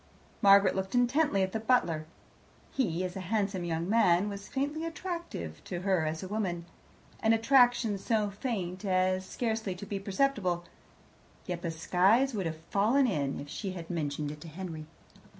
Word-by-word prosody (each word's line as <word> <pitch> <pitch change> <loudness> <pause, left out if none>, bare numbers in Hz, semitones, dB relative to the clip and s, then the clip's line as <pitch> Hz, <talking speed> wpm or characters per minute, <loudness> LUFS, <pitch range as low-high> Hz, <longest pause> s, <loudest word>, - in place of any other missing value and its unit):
Margaret 200 0 +6
looked 190 +3 -2
intently 245 -3 +3
at 190 - -1
the 220 - -2
butler. 175 -10 +1 0.6
He, 185 -9 0
as 180 -1 -4
a - - -4
handsome 200 -4 0
young 165 0 -2
man, 200 -3 +4
was 200 -1 -7
faintly 290 +4 -2
attractive 330 - -5
to 175 -1 -4
her 185 -4 +1
as 160 +2 -3
a - - -5
woman 185 -5 -2 0.5
an 220 0 +3
attraction 240 -3 +4
so 210 0 0
faint 195 -4 -4
as 185 -1 +1
scarcely 220 -5 -2
to 180 - -8
be 200 0 -3
perceptible, 195 -4 0 0.8
yet 175 -2 -4
the 170 - -2
skies 190 +10 +3
would 195 -5 -1
have 160 -1 -4
fallen 205 - +2
if 145 - -7
she 190 +5 -4
had 170 -1 -7
mentioned 150 -3 -2
it 150 0 -10
to 170 - -9
Henry. 160 -2 -7
195 Hz, 165 wpm, -30 LUFS, 175-225 Hz, 0.8 s, Margaret